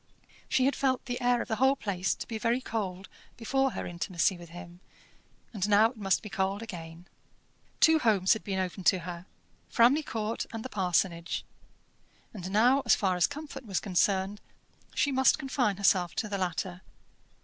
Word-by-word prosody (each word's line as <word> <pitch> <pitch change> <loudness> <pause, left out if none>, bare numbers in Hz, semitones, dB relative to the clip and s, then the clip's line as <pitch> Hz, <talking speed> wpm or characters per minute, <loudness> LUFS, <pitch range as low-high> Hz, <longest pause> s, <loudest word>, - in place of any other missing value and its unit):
She 260 - +3
had 275 0 +2
felt 260 -2 0
the 245 -1 -4
air 245 -1 +2
of - - -14
the 220 -2 -2
whole 265 +1 +4
place 195 -6 -1
to - - -7
be 225 -1 -4
very 230 +3 +1
cold 195 -6 -4 0.3
before 270 +3 0
her - - -4
intimacy 175 +2 0
with 175 -1 -12
him, 175 0 -11 0.7
and 205 -1 -1
now 215 +2 +5
it 255 - -18
must 195 -3 +1
be - - -6
cold 195 +2 -1
again. 170 -5 -9 0.7
Two 320 0 +6
homes 205 -7 +3
had 220 - -5
been 195 -2 -3
open 185 0 -3
to 190 - +5
her, 175 +1 -7 0.4
Framley 245 +6 +4
Court 225 -6 -3
and 225 0 -6
the - - -4
parsonage; 180 -4 -1 0.9
and 185 -4 -6
now, 240 +7 +4
as - - +5
far 190 -3 0
as 180 - +3
comfort 285 -2 -8
was 195 -3 0
concerned, 195 +1 0 0.5
she 285 - +2
must 265 0 +4
confine 265 -8 -1
herself 185 -3 +2
to 215 - -1
the 200 -1 -3
latter. 180 0 -3
205 Hz, 180 wpm, -29 LUFS, 185-245 Hz, 0.9 s, Two